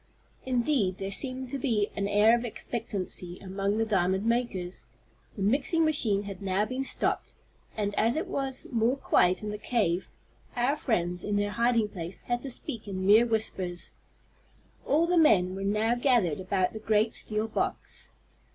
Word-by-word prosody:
Indeed 240 Hz, -7 st, +1 dB
there 195 Hz, 0 st, -4 dB
seemed 260 Hz, +3 st, -2 dB
to 275 Hz, -, -3 dB
be 220 Hz, -6 st, 0 dB
an 200 Hz, 0 st, -1 dB
air 210 Hz, +3 st, +5 dB
of 240 Hz, -, -2 dB
expectancy 195 Hz, -6 st, -4 dB
among 195 Hz, +2 st, -2 dB
the 225 Hz, -, +1 dB
diamond 190 Hz, -1 st, +1 dB
makers. 225 Hz, -7 st, -1 dB, 0.5 s
The 200 Hz, -, -3 dB
mixing 280 Hz, -, +2 dB
machine 225 Hz, -10 st, +3 dB
had 200 Hz, -2 st, -8 dB
now 195 Hz, +1 st, 0 dB
been 255 Hz, +4 st, -3 dB
stopped, -, -, -2 dB, 0.4 s
and, 205 Hz, -1 st, -1 dB
as 230 Hz, +2 st, +2 dB
it 320 Hz, +5 st, -1 dB
was 270 Hz, -8 st, -2 dB
more 235 Hz, +2 st, +2 dB
quiet 180 Hz, -7 st, +2 dB
in 210 Hz, -, -3 dB
the 210 Hz, -, -6 dB
cave, 190 Hz, -8 st, 0 dB, 0.5 s
our 250 Hz, +4 st, +2 dB
friends, 180 Hz, -, -1 dB
in 205 Hz, -, -1 dB
their 205 Hz, 0 st, 0 dB
hiding 235 Hz, -1 st, +2 dB
place, 175 Hz, -2 st, -7 dB
had 240 Hz, 0 st, -2 dB
to 275 Hz, -, -5 dB
speak 240 Hz, -3 st, -4 dB
in 190 Hz, -1 st, -3 dB
mere 220 Hz, +4 st, +6 dB
whispers. 190 Hz, -6 st, -2 dB, 1.0 s
All 310 Hz, +4 st, +3 dB
the 350 Hz, 0 st, +3 dB
men 190 Hz, -, +4 dB
were 195 Hz, +1 st, -5 dB
now 210 Hz, +3 st, +1 dB
gathered 240 Hz, -, +2 dB
about 185 Hz, -1 st, 0 dB
the 220 Hz, -, -6 dB
great 215 Hz, +1 st, +1 dB
steel 215 Hz, +1 st, -2 dB
box. 225 Hz, -, -3 dB
215 Hz, 170 wpm, -28 LUFS, 195-245 Hz, 1.0 s, mere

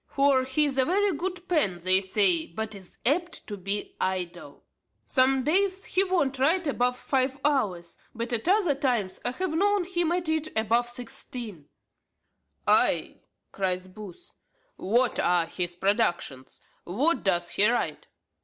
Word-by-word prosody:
For 275 Hz, -2 st, +2 dB
he 265 Hz, +4 st, +1 dB
is 270 Hz, -2 st, 0 dB
a 260 Hz, -, +4 dB
very 390 Hz, +2 st, +1 dB
good 360 Hz, +3 st, -4 dB
pen, 290 Hz, -, +1 dB
they 185 Hz, +2 st, +3 dB
say, 190 Hz, -4 st, +2 dB
but 220 Hz, +5 st, -5 dB
is 190 Hz, -3 st, -12 dB
apt 345 Hz, +6 st, 0 dB
to 205 Hz, -, -5 dB
be 200 Hz, +2 st, -4 dB
idle. 185 Hz, -2 st, -4 dB, 0.4 s
Some 265 Hz, 0 st, +2 dB
days 380 Hz, +6 st, +1 dB
he 375 Hz, -, +2 dB
won't 315 Hz, -9 st, 0 dB
write 330 Hz, +7 st, +2 dB
above 250 Hz, -3 st, 0 dB
five 265 Hz, +1 st, -1 dB
hours; 190 Hz, -, 0 dB, 0.2 s
but 235 Hz, +1 st, -4 dB
at 230 Hz, +6 st, -1 dB
other 380 Hz, -6 st, +3 dB
times 245 Hz, -9 st, -1 dB
I -, -, 0 dB
have 340 Hz, +6 st, -3 dB
know 400 Hz, +3 st, +2 dB
him 345 Hz, -2 st, -1 dB
at 350 Hz, -1 st, -1 dB
it 315 Hz, -1 st, 0 dB
above 230 Hz, +2 st, +2 dB
sixteen." 235 Hz, -, -7 dB, 1.0 s
"Ay!" -, -, +2 dB, 0.3 s
cries 185 Hz, -1 st, -2 dB
Booth; 210 Hz, -, -12 dB, 0.4 s
"pray, -, -, -10 dB
what 240 Hz, +4 st, +2 dB
are 175 Hz, -2 st, +2 dB
his 175 Hz, +1 st, -4 dB
productions? 175 Hz, -, -1 dB, 0.2 s
What 260 Hz, -, 0 dB
does 175 Hz, -3 st, +1 dB
he 200 Hz, +5 st, +4 dB
write?" 240 Hz, -, -2 dB
250 Hz, 155 wpm, -27 LUFS, 190-315 Hz, 1.0 s, a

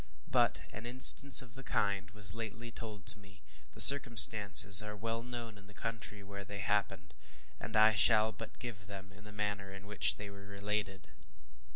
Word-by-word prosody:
But -, -, -4 dB
an 110 Hz, +3 st, -13 dB
instance 130 Hz, +2 st, +4 dB
of 120 Hz, -2 st, -21 dB
the 135 Hz, -, -15 dB
kind 100 Hz, -6 st, -7 dB
was 105 Hz, -1 st, +2 dB
lately 115 Hz, +1 st, -13 dB
told 105 Hz, -5 st, -15 dB
to 105 Hz, 0 st, -1 dB
me; 95 Hz, -1 st, -24 dB, 0.3 s
the -, -, -18 dB
circumstances 110 Hz, -7 st, +6 dB
are 105 Hz, 0 st, -13 dB
well 115 Hz, +2 st, -9 dB
known 120 Hz, -3 st, -13 dB
in 100 Hz, -, -24 dB
the 105 Hz, -, -23 dB
country 110 Hz, -3 st, -12 dB
where 100 Hz, 0 st, -14 dB
they 100 Hz, 0 st, -14 dB
happened, 95 Hz, -2 st, -8 dB, 0.5 s
and 110 Hz, +2 st, -12 dB
I 110 Hz, 0 st, 0 dB
shall 110 Hz, +1 st, 0 dB
but 115 Hz, 0 st, -16 dB
give 105 Hz, -5 st, -14 dB
them 95 Hz, -1 st, -15 dB
in 100 Hz, +2 st, -22 dB
the 105 Hz, -, -17 dB
manner 105 Hz, -2 st, -9 dB
in 95 Hz, +1 st, -16 dB
which 105 Hz, 0 st, -3 dB
they 100 Hz, -1 st, -14 dB
were 100 Hz, 0 st, -18 dB
related. 100 Hz, -1 st, -10 dB
105 Hz, 185 wpm, -28 LUFS, 100-115 Hz, 0.5 s, circumstances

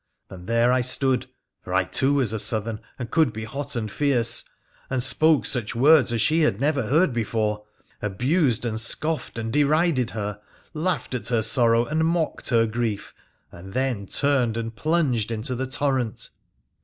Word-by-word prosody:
And 90 Hz, -1 st, -11 dB
there 115 Hz, +1 st, +2 dB
I 130 Hz, 0 st, +2 dB
stood 130 Hz, +1 st, +1 dB, 0.2 s
— -, -, -59 dB
for 90 Hz, -, -4 dB
I 95 Hz, -, +3 dB
too 135 Hz, +9 st, +1 dB
was 125 Hz, -6 st, +1 dB
a 110 Hz, -, -2 dB
Southern, 110 Hz, 0 st, +1 dB, 0.2 s
and 120 Hz, -2 st, -7 dB
could 160 Hz, -6 st, +3 dB
be 110 Hz, 0 st, -7 dB
hot 140 Hz, +5 st, -4 dB
and 110 Hz, -3 st, -3 dB
fierce 130 Hz, -4 st, +2 dB, 0.2 s
— -, -, -33 dB
and 130 Hz, -2 st, -1 dB
spoke 150 Hz, -2 st, +3 dB
such 120 Hz, -5 st, -1 dB
words 140 Hz, 0 st, +5 dB
as 115 Hz, -2 st, 0 dB
she 160 Hz, +2 st, +2 dB
had 150 Hz, -10 st, +1 dB
never 140 Hz, -4 st, 0 dB
heard 150 Hz, +3 st, +2 dB
before— 105 Hz, -2 st, -2 dB, 0.4 s
abused 125 Hz, -, 0 dB
and 110 Hz, -2 st, -2 dB
scoffed 155 Hz, +5 st, -2 dB
and 115 Hz, 0 st, -4 dB
derided 150 Hz, -3 st, +2 dB
her: 105 Hz, -1 st, -5 dB, 0.3 s
laughed 160 Hz, -5 st, -2 dB
at 125 Hz, -, -3 dB
her 115 Hz, -3 st, +1 dB
sorrow 115 Hz, 0 st, +3 dB
and 155 Hz, +4 st, -1 dB
mocked 165 Hz, 0 st, -1 dB
her 115 Hz, -2 st, +3 dB
grief, 110 Hz, -2 st, -3 dB, 0.4 s
and 95 Hz, +3 st, -12 dB
then 130 Hz, -7 st, -1 dB
turned 130 Hz, -4 st, +1 dB
and 115 Hz, -1 st, -5 dB
plunged 145 Hz, -7 st, 0 dB
into 115 Hz, +3 st, -3 dB
the 130 Hz, +2 st, -3 dB
torrent. 130 Hz, -4 st, -2 dB
120 Hz, 180 wpm, -23 LUFS, 110-145 Hz, 0.4 s, words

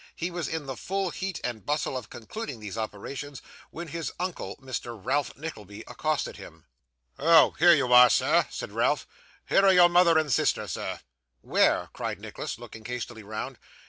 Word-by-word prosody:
He 170 Hz, +2 st, -3 dB
was 170 Hz, -4 st, -3 dB
in 160 Hz, -2 st, -4 dB
the 135 Hz, -1 st, -5 dB
full 195 Hz, +3 st, -2 dB
heat 190 Hz, +2 st, -4 dB
and 115 Hz, -4 st, -4 dB
bustle 150 Hz, -2 st, -1 dB
of 130 Hz, -, -5 dB
concluding 130 Hz, -, -7 dB
these 105 Hz, -2 st, -7 dB
operations, 125 Hz, +6 st, -6 dB, 0.3 s
when 170 Hz, 0 st, -7 dB
his 165 Hz, +1 st, -4 dB
uncle, 180 Hz, -1 st, -4 dB
Mr. 120 Hz, -4 st, -6 dB
Ralph 130 Hz, +4 st, -1 dB
Nickleby, 105 Hz, -, -8 dB
accosted -, -, -2 dB
him. -, -, -13 dB, 0.5 s
'Oh! 160 Hz, +2 st, +6 dB
here 175 Hz, +1 st, +8 dB
you 125 Hz, -4 st, +1 dB
are, 125 Hz, 0 st, +9 dB
sir!' -, -, +3 dB
said -, -, -6 dB
Ralph. -, -, +1 dB, 0.4 s
'Here 195 Hz, -, +4 dB
are 195 Hz, -1 st, +6 dB
your 175 Hz, -1 st, +7 dB
mother 175 Hz, -2 st, +5 dB
and 155 Hz, -4 st, +1 dB
sister, -, -, +1 dB
sir.' -, -, -4 dB, 0.4 s
'Where?' -, -, +2 dB
cried -, -, -4 dB
Nicholas, -, -, -6 dB
looking 110 Hz, -, -11 dB
hastily 120 Hz, -1 st, -5 dB
round. 110 Hz, +1 st, -6 dB
145 Hz, 175 wpm, -27 LUFS, 120-170 Hz, 0.5 s, are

